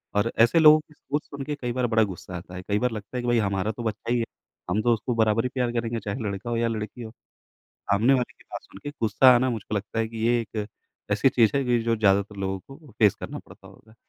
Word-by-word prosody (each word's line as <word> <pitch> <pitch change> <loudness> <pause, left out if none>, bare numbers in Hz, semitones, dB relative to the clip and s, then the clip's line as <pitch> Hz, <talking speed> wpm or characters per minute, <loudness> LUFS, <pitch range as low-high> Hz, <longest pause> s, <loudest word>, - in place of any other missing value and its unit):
और 105 +3 +1
ऐसे 120 +8 +5
लोगों 155 0 +8
की 155 0 -16
सोच 145 +1 -4
सुन 140 -1 -7
के 150 - -3
कई 125 -1 -2
बार 125 -1 0
बड़ा 110 -1 +3
गुस्सा 95 -2 -6
आता 90 +1 -10
है। 90 - -6
कई 105 0 +1
बार 125 0 0
लगता 110 +3 -6
है - - -1
कि - - -3
भाई 120 -1 +3
हमारा 100 +1 0
तो 120 - -5
बच्चा 110 +1 -3
ही 120 - +3
है। 115 - 0 0.4
हम 105 +4 +1
तो 120 0 +3
उसको 115 +2 -2
बराबर 110 0 +2
ही - - 0
प्यार 125 -2 0
करेंगे, 115 0 -3
चाहे 100 +4 -5
लड़का 100 +4 -5
हो 115 - -1
या 115 0 +1
लड़की 110 +1 -4
हो, 110 - -7 0.8
सामने 115 +7 +4
वाले 125 -2 -1
की - - -23
बात - - -8
सुनके 145 +9 -9
गुस्सा 125 +4 +6
आना 130 +2 +2
मुझको 110 -2 -4
लगता 105 +2 -3
है 115 - 0
कि 115 - -10
ये 120 0 +3
एक, 105 -1 -5 0.5
ऐसी 105 +6 +4
चीज़ 115 -4 +3
है 140 - +1
कि 120 -1 +2
जो 115 0 +1
ज़्यादातर 100 -1 +2
लोगों 95 -1 -2 0.2
को 150 -7 -18
फेस 105 -3 +5
करना - - -6
पड़ता - - -16
होगा। 110 0 -19
115 Hz, 265 wpm, -25 LUFS, 105-125 Hz, 0.8 s, लोगों